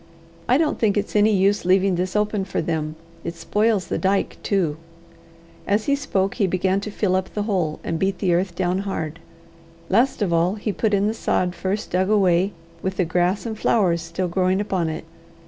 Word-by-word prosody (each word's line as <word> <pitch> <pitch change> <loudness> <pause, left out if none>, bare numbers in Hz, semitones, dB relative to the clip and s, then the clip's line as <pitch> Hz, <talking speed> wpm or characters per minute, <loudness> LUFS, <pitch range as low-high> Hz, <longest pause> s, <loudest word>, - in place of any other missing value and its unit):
"I 250 - +5
don't 310 -1 0
think 210 -2 +2
it's 205 +1 -2
any 210 +1 +5
use 200 +1 +2
leaving 190 +1 +3
this 180 +2 -2
open 210 -1 +1
for 195 - -3
them. 155 -1 -2 0.3
It 170 +1 -4
spoils 205 +4 +1
the - - -2
dyke 195 +1 0
too." 175 -7 0 0.9
As 205 +2 +1
he 280 - +3
spoke 195 -9 -1
he 200 -5 +1
began 185 +1 +1
to 210 - -5
fill 200 -2 0
up 185 0 -1
the 210 - 0
hole, 180 -8 -1
and 165 - -2
beat 195 -1 0
the 180 -4 +1
earth 175 0 0
down 180 0 0
hard. 165 -5 -4 0.7
Last 235 +3 +2
of 175 -4 0
all, 170 +4 +2
he 210 0 -2
put 215 -1 +1
in 200 0 +2
the 215 - +1
sod 180 -5 0
first 195 +3 -3
dug 185 +2 +1
away, 190 -2 +3 0.3
with 190 0 -3
the 185 - +2
grass 180 +5 0
and 225 -1 -3
flowers 185 -6 +2
still 175 +3 -3
growing 185 +2 +1
upon 190 -5 -1
it. 160 0 -5
190 Hz, 200 wpm, -22 LUFS, 175-205 Hz, 0.9 s, I